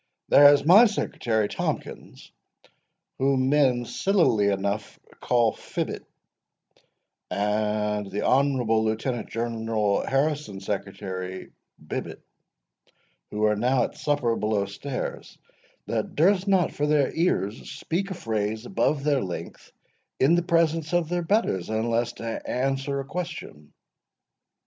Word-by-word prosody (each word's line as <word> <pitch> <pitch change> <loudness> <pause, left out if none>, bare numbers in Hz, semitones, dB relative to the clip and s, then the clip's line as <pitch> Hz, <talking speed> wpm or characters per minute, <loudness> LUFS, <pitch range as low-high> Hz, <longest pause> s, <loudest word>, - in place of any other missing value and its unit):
"There 145 0 +8
is 145 0 +2
my 205 +9 +8
secretary 110 - -1
Tomkins, - - -5 0.9
whom 135 -1 +2
men 130 -4 +3
sillily 165 - +2
enough 100 +1 -2 0.2
call 120 -2 +2
Fibbet, - - -5 1.3
and 105 0 -1
the 105 +2 -3
honourable 125 -5 +2
Lieutenant 110 +2 -2
General 115 -3 -1
Harrison's 135 -8 -1
secretary 95 -2 -5 0.3
Bibbet, - - -6 1.1
who 105 +1 -3
are 105 0 +3
now 125 +3 +2
at - - -4
supper 145 -6 0
below 105 -2 0
stairs, 125 +7 -6 0.5
that - - -3
durst 185 +4 +3
not 190 -4 +3
for 150 - -1
their 150 -3 +2
ears 120 - -1
speak 170 +7 -3
a 190 - -4
phrase 110 -2 -2
above 150 -7 0
their 145 -3 +1
breath 90 -2 -7 0.5
in 135 +5 +4
the 175 - +3
presence 165 -1 +1
of 170 -2 +1
their 175 0 0
betters, 165 - 0
unless 115 +2 0
to 115 -1 -5
answer 135 +2 -1
a - - -8
question." 155 - -7
125 Hz, 120 wpm, -25 LUFS, 105-150 Hz, 1.3 s, There